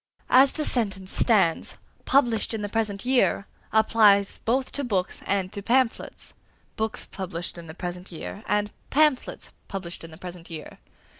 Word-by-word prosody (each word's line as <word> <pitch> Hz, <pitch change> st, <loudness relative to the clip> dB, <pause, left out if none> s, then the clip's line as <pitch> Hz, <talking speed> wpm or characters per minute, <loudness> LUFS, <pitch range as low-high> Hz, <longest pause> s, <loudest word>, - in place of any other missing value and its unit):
As 265 Hz, +2 st, +7 dB
the 305 Hz, -, -2 dB
sentence 195 Hz, -6 st, -1 dB
stands, 195 Hz, -8 st, +2 dB, 0.3 s
"published 235 Hz, -5 st, +2 dB
in 210 Hz, -, -4 dB
the 205 Hz, -, -3 dB
present 210 Hz, -1 st, -1 dB
year" 250 Hz, -5 st, +2 dB, 0.3 s
applies 215 Hz, -2 st, +4 dB
both 255 Hz, +3 st, 0 dB
to 285 Hz, -, -2 dB
books 195 Hz, -7 st, -1 dB
and 195 Hz, -1 st, 0 dB
to 200 Hz, -, -4 dB
pamphlets: 245 Hz, +3 st, 0 dB, 0.4 s
books 220 Hz, 0 st, -2 dB
published 180 Hz, -3 st, -5 dB
in 170 Hz, -1 st, -9 dB
the 160 Hz, -, -9 dB
present 180 Hz, +1 st, -5 dB
year, 190 Hz, +5 st, -7 dB
and 210 Hz, 0 st, +1 dB, 0.2 s
pamphlets 300 Hz, -3 st, +1 dB, 0.2 s
published 185 Hz, -4 st, -6 dB
in 165 Hz, -, -9 dB
the 160 Hz, -, -12 dB
present 180 Hz, -1 st, -9 dB
year. 160 Hz, -2 st, -9 dB
205 Hz, 155 wpm, -26 LUFS, 180-230 Hz, 0.4 s, As